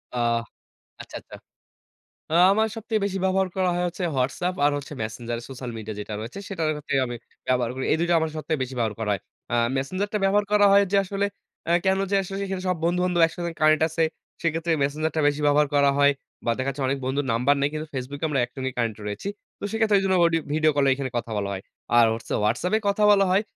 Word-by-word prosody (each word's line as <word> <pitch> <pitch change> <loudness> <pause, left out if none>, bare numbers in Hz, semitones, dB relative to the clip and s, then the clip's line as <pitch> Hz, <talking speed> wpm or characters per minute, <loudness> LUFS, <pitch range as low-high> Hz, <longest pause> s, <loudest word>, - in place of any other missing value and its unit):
আ - - -2 0.8
আচ্ছা, - - -12
আচ্ছা। - - -12 1.0
আ - - 0 0.2
আমার 220 +2 +3
সবচেয়ে 220 -1 -2
বেশি 195 -1 -2
ব্যবহার 190 0 +2
করা 185 -1 +2
হয় 175 0 0
হচ্ছে 180 +1 -5
WhatsApp 145 +8 0
আর 145 - +5
হচ্ছে 145 +1 -9
Messenger 115 +2 -4
সোশ্যাল 130 -2 -6
মিডিয়া 110 -1 -6
যেটা 105 +1 -5
রয়েছে 115 - -7
সেটার 165 -6 -1
হচ্ছে 145 - -4
আমি 120 0 -5 0.3
ব্যবহার 125 -2 +1
করি। 130 - -3
এই - - +4
২ 170 - +1
টা - - +5
আমার 160 -1 -1
সবচেয়ে 155 -1 -2
বেশি 130 0 -5
ব্যবহার 110 -2 0
করা 105 -2 -1
হয়। 100 - -2 0.3
আ - - +2 0.2
Messenger 185 +10 -1
টা 210 - +1
ব্যবহার 205 +1 +3
করা 205 -1 +6
হয় 200 0 +7
যে, - - +4
আসলে 200 +1 -1 0.4
আ - - +3
কেন 190 0 +3
যে, - - +1
আশেপাশে 195 +1 -4 0.2
সব 180 - +1
বন্ধু-বান্ধব 180 0 +1
একসাথে 170 +1 -5
connect 155 0 +4
আছে। 160 +1 -1 0.4
সেক্ষেত্রে 165 0 0
Messenger 155 +3 0
টা - - +3
বেশি 145 +1 -2
ব্যবহার 145 0 +4
করা 140 -1 +5
হয়। 145 0 +5 0.3
বা - - +3
দেখা 135 +1 -1
যাচ্ছে 135 +1 -5
অনেক 135 +1 0
বন্ধুর 135 +1 -1
নাম্বার 125 +5 +3
নেই 140 - +2
কিন্তু 155 +1 -4
Facebook 135 +2 -5
এ - - +2
আমরা 140 -3 0
একসঙ্গে 130 +1 -5
connect 115 -3 -1
রয়েছি। 105 - -4 0.3
তো - - -8
সেক্ষেত্রে 220 -2 +3
এইজন্য 195 -1 +1
audio 165 -1 +3
video 155 0 +3
কলে 140 -1 +3 0.3
কথা 115 0 -6
বলা 100 -1 -2
হয়। 95 0 -5 0.4
আর 115 - +7
হচ্ছে 115 - -7
WhatsApp 120 - +1
এ - - -10
কথা 200 +1 +1
বলা 195 -1 +5
হয় 195 +3 +3
155 Hz, 220 wpm, -25 LUFS, 130-185 Hz, 1.0 s, হয়